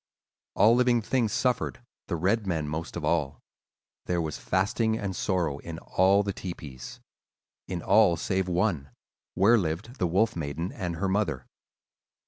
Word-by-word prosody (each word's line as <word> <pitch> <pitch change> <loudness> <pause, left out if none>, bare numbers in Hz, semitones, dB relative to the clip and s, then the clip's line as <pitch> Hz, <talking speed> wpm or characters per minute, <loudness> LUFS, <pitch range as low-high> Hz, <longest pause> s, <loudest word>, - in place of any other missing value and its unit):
All 105 +4 +6
living 120 -2 +3
things 115 -2 0
suffered, 125 +2 0 0.3
the - - -1
red 100 +6 0
men 80 -5 -1
most 80 +3 -4
of - - -4
all; 70 - 0 0.7
there 90 -1 0
was 80 -2 -3
fasting 110 +4 0
and 100 -4 -4
sorrow 85 -7 -1
in 80 +1 -7
all 95 +4 +3
the 100 -1 -2
tepees—in 85 +1 -9
all 100 -4 +5
save 95 +2 -1
one, 85 -6 0 0.5
where 110 +5 +5
lived 95 - -4
the 90 - +2
Wolf 110 +7 +2
Maiden 80 +3 -3
and 90 -2 -4
her 90 +4 -1
mother. 95 -10 -1
95 Hz, 145 wpm, -27 LUFS, 85-105 Hz, 0.7 s, All